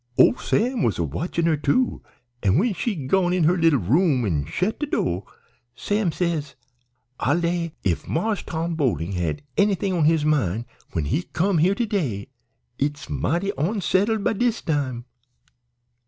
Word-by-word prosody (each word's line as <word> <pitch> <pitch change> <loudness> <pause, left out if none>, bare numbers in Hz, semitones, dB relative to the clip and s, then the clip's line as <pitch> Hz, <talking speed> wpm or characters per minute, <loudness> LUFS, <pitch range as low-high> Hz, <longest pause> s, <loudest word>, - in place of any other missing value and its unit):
"Ole - - +6
Sam 245 +1 0
was 115 - +1
a 85 - 0
watchin' 165 - -2
her, 165 -2 +3
too, 150 - +1 0.4
an' 100 +3 +3
when 215 +5 +2
she'd 185 - -3
gone 180 +2 +2
in 180 -2 +2
her 170 +4 +4
leetle 165 -4 +4
room 130 - +2
an' 75 -8 0
shet 180 - -1
de 295 - -2
do' 90 - -1 0.5
Sam 205 -4 0
says, 160 -4 -2 0.6
'I'll 145 +5 +2
lay 170 -1 -1
if 90 -4 -1
Marse 205 +5 0
Tom 165 +1 -3
Boling 105 - 0
had 85 -5 -2
anythin' 200 -1 +2
on 165 -4 +2
his 155 -1 +3
mind 120 - +1 0.3
when 80 - -1
he 145 - 0
come 180 0 0
here 185 +5 +3
to 240 - 0
day 140 - -2 0.5
it's 145 0 -2
mighty 175 +7 0
onsettled 200 +4 0
by - - +2
dis 235 +1 0
time.' 130 -6 -1
165 Hz, 165 wpm, -23 LUFS, 130-195 Hz, 0.6 s, Ole